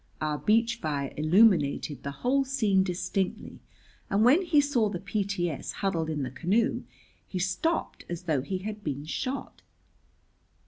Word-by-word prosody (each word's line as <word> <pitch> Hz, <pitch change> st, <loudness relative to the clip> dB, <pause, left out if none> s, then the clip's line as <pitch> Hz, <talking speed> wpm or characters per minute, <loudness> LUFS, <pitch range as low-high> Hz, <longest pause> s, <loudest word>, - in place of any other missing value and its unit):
Our 150 Hz, -1 st, -1 dB
beach 230 Hz, +2 st, +2 dB
fire 140 Hz, -3 st, -3 dB
illuminated 155 Hz, -, +3 dB
the 140 Hz, -, -4 dB, 0.2 s
whole 275 Hz, +2 st, +3 dB
scene 220 Hz, -8 st, +2 dB
distinctly, 185 Hz, +1 st, -2 dB, 0.5 s
and 205 Hz, +3 st, +3 dB
when 280 Hz, +9 st, +6 dB
he 320 Hz, -5 st, +3 dB
saw 270 Hz, -7 st, +2 dB
the 195 Hz, -, -3 dB
P.T.S. 195 Hz, -5 st, -2 dB
huddled 170 Hz, -5 st, -1 dB
in 150 Hz, -3 st, -2 dB
the 130 Hz, -, -4 dB
canoe 190 Hz, -, 0 dB, 0.4 s
he 190 Hz, -, -5 dB
stopped 190 Hz, -, -1 dB
as 175 Hz, 0 st, -5 dB
though 155 Hz, -6 st, +1 dB
he 185 Hz, +8 st, -3 dB
had 210 Hz, +2 st, -6 dB
been 145 Hz, -2 st, -3 dB
shot. 255 Hz, -, -4 dB
190 Hz, 145 wpm, -28 LUFS, 155-225 Hz, 0.5 s, when